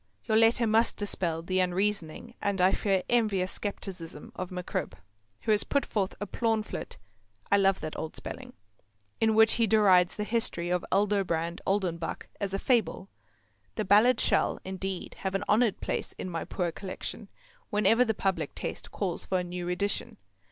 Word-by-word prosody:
Your 220 - +1
letter 225 +1 +5
must 225 +1 +3
dispel 170 -5 -1
the 185 +2 0
unreasoning 185 -2 -1
and 200 -1 0
I 185 +1 +5
fear 195 -3 +1
envious 210 -6 +1
scepticism 180 -6 -6
of 185 -1 -4
MacCribb, 180 -1 -4 0.5
who - - 0
has 210 -1 +4
put 280 - 0
forth 200 -3 -2
a 205 - -3
plaunflet 220 +1 -2 0.5
(I 200 - +6
love 195 -1 +3
that 155 0 -5
old 160 - -5
spelling) - - -6 0.7
in 220 -1 +3
which 220 0 +6
he 225 - +4
derides 190 -4 +5
the 210 - -2
history 210 -6 -1
of 180 0 +1
Aldobrand 190 -4 +1
Oldenbuck 180 -4 -1
as 200 -2 -2
a 195 - -1
fable. 220 -4 0 0.7
The 215 - -2
Ballad 215 +6 +5
shall, - - +2
indeed, 190 0 -4
have 190 0 -2
an 195 - 0
honoured 220 0 +2
place - - -2
in 185 - -6
my 165 -1 -3
poor 175 -1 -2
Collection 190 +2 -6 0.4
whenever 225 +3 +4
the 220 -3 -1
public 195 -1 -1
taste - - -5
calls 185 -4 -3
for 185 - +1
a 180 - -1
new 175 0 -5
edition. 200 +3 -1
195 Hz, 165 wpm, -29 LUFS, 180-215 Hz, 0.7 s, I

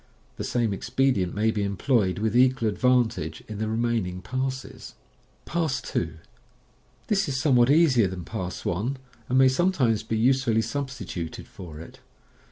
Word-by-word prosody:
The - - -4
same 115 -4 0
expedient 120 -4 0
may 110 +2 +2
be 105 - -2
employed 100 0 +1
with 110 +2 -1
equal 125 -2 +4
advantage 115 -8 +1
in 105 -1 -6
the 110 - -1
remaining 110 -5 -1
parses. 130 +1 -4 0.5
Pass 160 -5 -1
2. 85 -2 -3 0.5
— - - -36
This 195 -6 +1
is 130 -1 -1
somewhat 125 -4 +4
easier 140 - +5
than 90 -2 -6
Pass 90 -5 -5
1, 110 +11 -1 0.3
and 130 - +2
may 130 0 +7
some 175 +9 +2
times 115 - +1
be 110 - -2
usefully 120 -1 +2
substituted 115 - -5
for 80 -5 -10
it. 80 - -11
115 Hz, 155 wpm, -26 LUFS, 100-130 Hz, 0.5 s, may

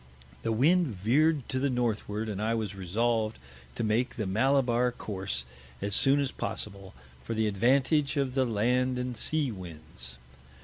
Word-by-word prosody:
The 115 - -1
Wind 165 +10 +4
veer'd 130 - +2
to 130 - 0
the 140 +1 +1
Northward, 110 -3 -1
and 105 -1 -3
I 115 +1 +1
was 110 -3 -2
resolved 110 +4 0 0.4
to - - -2
make 110 +3 +1
the 110 - -2
Mallabar 125 +3 +2
Course 95 - -4 0.3
as 100 - -1
soon 135 +6 +4
as 140 -2 0
possible, 100 -6 -5 0.3
for 115 - -3
the 110 0 +1
Advantage 135 - +2
of 135 -2 0
the 135 0 +3
Land 125 +3 +1
and 125 0 -3
Sea 150 +2 0
Winds. 80 - -8
115 Hz, 160 wpm, -29 LUFS, 105-130 Hz, 0.4 s, Wind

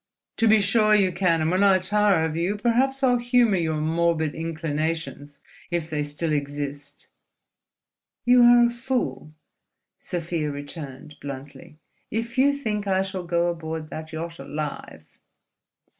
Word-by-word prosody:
"To 230 - +3
be 215 -1 +5
sure 215 +2 +3
you 195 -3 +4
can! 170 -3 +1
And 155 +1 +1
when 185 +2 +2
I 195 -2 +6
tire 195 -2 +2
of 160 -1 -3
you, 175 +5 0
perhaps 260 +5 +1
I'll 245 -2 +4
humour 240 -4 +3
your 160 -3 -1
morbid 160 0 0
inclinations—if 160 0 -4
they 150 -1 -1
still 150 +2 -2
exist." 145 0 -4 1.2
"You 245 0 +6
are 240 0 +7
a 235 - +1
fool," 240 -10 -3 0.6
Sofia 165 -3 -3
returned, 145 0 -8
bluntly, 145 +3 -9 0.3
"if 230 +2 -3
you 280 +2 +5
think 215 -8 -3
I 190 0 +2
shall 190 -1 -5
go 170 0 +1
aboard 160 -2 -4
that 160 0 -7
yacht 165 +1 -6
alive." 150 +2 -7
170 Hz, 140 wpm, -24 LUFS, 155-210 Hz, 1.2 s, are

